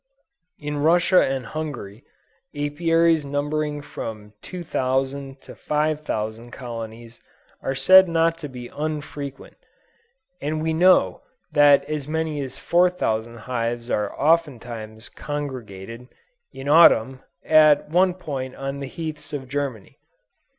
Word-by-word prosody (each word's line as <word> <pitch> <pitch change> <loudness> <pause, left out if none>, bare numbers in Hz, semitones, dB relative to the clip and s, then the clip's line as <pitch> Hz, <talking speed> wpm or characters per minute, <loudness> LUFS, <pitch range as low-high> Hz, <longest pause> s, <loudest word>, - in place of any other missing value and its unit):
In 150 0 -4
Russia 170 +4 +4
and 135 -2 -2
Hungary, 120 -5 -6 0.5
Apiaries 165 +2 +2
numbering 145 +1 -2
from 105 -7 -7
2000 135 -5 -2
to - - -12
5000 150 -7 -2
colonies 115 -1 -8 0.4
are 135 - -2
said 190 +5 +7
not 165 0 +2
to 150 -3 -6
be 125 -2 -8
unfrequent; 145 -2 -6 0.8
and 155 +2 -2
we 160 0 0
know 170 - +4 0.3
that 145 -1 +5
as 150 -1 -4
many 160 -1 -2
as 135 -2 -6
4000 120 -11 +1
hives 120 -1 -3
are 105 -1 -2
oftentimes 120 -8 -1
congregated, 125 -6 -7 0.4
in 135 +1 -8
Autumn, 135 -5 +6 0.3
at 155 -2 +5
one 180 +3 +3
point 135 -7 -5
on 135 +1 -5
the 140 - -5
heaths 155 0 -7
of 135 -3 -5
Germany. 135 -6 -4
145 Hz, 115 wpm, -23 LUFS, 120-155 Hz, 0.8 s, said